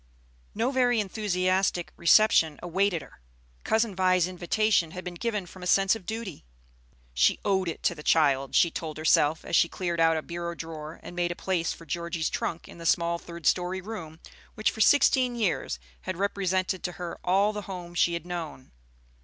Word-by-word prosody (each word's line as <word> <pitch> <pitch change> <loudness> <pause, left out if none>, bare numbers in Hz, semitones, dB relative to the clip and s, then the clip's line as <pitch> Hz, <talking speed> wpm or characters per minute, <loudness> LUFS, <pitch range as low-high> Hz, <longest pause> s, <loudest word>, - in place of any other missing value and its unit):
No 230 +5 0
very 245 -3 +2
enthusiastic 185 -3 0
reception 170 -3 +4
awaited 180 -1 0
her. - - -17 0.4
Cousin 220 -2 +1
Vi's 185 -1 +3
invitation 185 0 +1
had 185 - -5
been 180 - -6
given 210 +1 -3
from 185 +1 -13
a 180 - -4
sense 195 +2 +4
of 205 -6 -11
duty. 220 -7 -5 0.7
She - - +3
"owed 190 -2 +1
it 165 - -7
to - - +2
the 155 - -10
child," 140 -4 +2
she 170 - +4
told 155 -2 -5
herself, 155 0 +2
as - - -1
she 170 - +4
cleared 175 -2 -3
out 165 0 +4
a 155 - -3
bureau 170 0 -5
drawer, 160 -1 -8
and 175 - -9
made 175 0 0
a - - -4
place 175 -3 -1
for 165 - -9
Georgie's 170 0 -2
trunk 165 - -3
in - - -13
the 165 - -3
small 170 +1 +2
third 170 -2 -10
story 180 +3 +1
room 180 -6 -8 0.4
which 215 - +1
for 220 - -5
sixteen 255 -1 +4
years 200 - -1 0.2
had 65 - -5
represented 190 -1 -1
to 180 - -4
her 175 +1 -6
all 195 +4 +2
the 210 - -4
home 175 -2 -7
she 170 0 +2
had 170 0 -6
known. 170 -7 -6
175 Hz, 185 wpm, -27 LUFS, 165-195 Hz, 0.7 s, reception